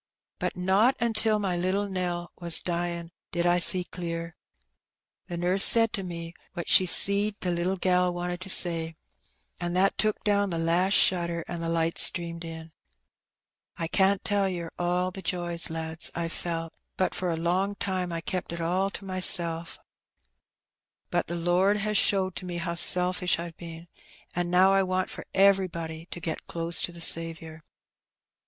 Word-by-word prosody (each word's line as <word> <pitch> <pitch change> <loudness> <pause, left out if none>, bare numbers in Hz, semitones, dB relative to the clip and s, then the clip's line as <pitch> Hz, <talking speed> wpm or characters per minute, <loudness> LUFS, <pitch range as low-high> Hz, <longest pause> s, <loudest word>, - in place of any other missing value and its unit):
But - - -3
not 195 +8 +3
until 225 -2 +1
my 195 -4 -2
little 185 +3 -1
Nell 175 -2 -3
was 170 -2 +5
dyin' 170 -1 -3 0.2
did 175 -1 -1
I 175 0 +3
see 180 +1 +7
clear. 170 -1 -6 0.9
The 175 - -5
nurse 180 +3 +4
said 225 -1 +6
to 195 - -2
me 170 -2 -7 0.2
what 175 -2 -6
she 185 - +6
seed 200 +3 +4
the 180 - -1
little 175 +2 -1
gal 180 0 +1
wanted 175 0 -4
to 190 - -6
say, 165 -3 +1 0.6
an' 175 0 -3
that 190 +2 +1
took 215 +1 0
down 205 -1 +1
the 170 - -3
last 170 +4 +1
shutter, 170 -2 +2
an' 170 -1 -5
the 165 - -3
light 165 0 0
streamed 170 -1 -1
in. 160 -1 -9 1.1
I 165 - -3
can't 190 +3 +2
tell 200 -2 +1
yer 170 -3 -5
all 180 +1 0
the 190 - -8
joys, 175 -2 -3
lads, 160 0 -5
I've 170 -1 -3
felt, 165 -1 -4 0.2
but 185 - 0
for 185 - -3
a 165 - -2
long 185 +4 -1
time 185 -3 -3
I 165 0 -3
kept 180 +1 -4
it 170 - -5
all 180 +4 0
to 200 - -7
mysel'. 170 -3 +1 1.4
But - - 0
the 175 - -4
Lord 180 +4 +2
has 210 +1 -2
showed 190 -2 +2
to - - -6
me 175 -1 -5
how 170 0 -3
selfish 180 +1 +5
I've 170 -1 -7
been, 165 0 -10 0.5
an' 175 0 -1
now 185 +2 +4
I 195 - +4
want 185 0 -1
for - - -9
everybody 170 -4 +1
to - - -7
get 165 -1 -5
close 165 0 -2
to - - -3
the 170 -1 -11
Saviour." 165 -1 -1
175 Hz, 175 wpm, -27 LUFS, 170-190 Hz, 1.4 s, see